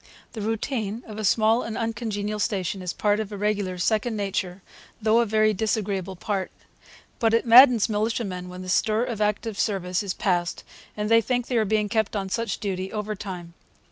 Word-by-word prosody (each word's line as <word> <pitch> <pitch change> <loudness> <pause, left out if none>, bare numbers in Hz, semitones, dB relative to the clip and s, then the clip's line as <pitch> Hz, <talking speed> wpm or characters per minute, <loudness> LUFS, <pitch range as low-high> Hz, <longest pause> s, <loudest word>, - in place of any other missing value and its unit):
The 220 - -5
routine 225 0 -2
of 215 -1 -8
a - - -3
small 220 +4 +3
and 225 - -5
uncongenial 215 -2 -3
station 195 -3 -1
is 180 -1 -3
part 205 +2 +1
of 215 -1 -4
a 205 - -5
regular's 200 -3 -1
second 220 +2 0
nature, 190 -2 -3 0.4
though 220 +1 +3
a 235 - +2
very 215 0 +3
disagreeable 200 -3 -2
part. 195 +1 -2 0.7
But 225 -2 +3
it 230 - +1
maddens 240 -1 +8
militiamen 210 -4 -2
when 180 +1 -8
the 185 - -7
stir 215 +4 +2
of 235 -4 -4
active 210 0 -1
service 185 -4 0
is 200 -3 -3
past 175 -2 -1 0.3
and 210 0 -1
they 230 +1 +5
think 245 +2 -1
they 245 - -1
are 220 - +3
being 210 0 +1
kept 220 0 0
on 195 -2 -2
such 230 +3 -2
duty 190 -2 -3
overtime. 200 -5 -5
210 Hz, 185 wpm, -25 LUFS, 195-225 Hz, 0.7 s, maddens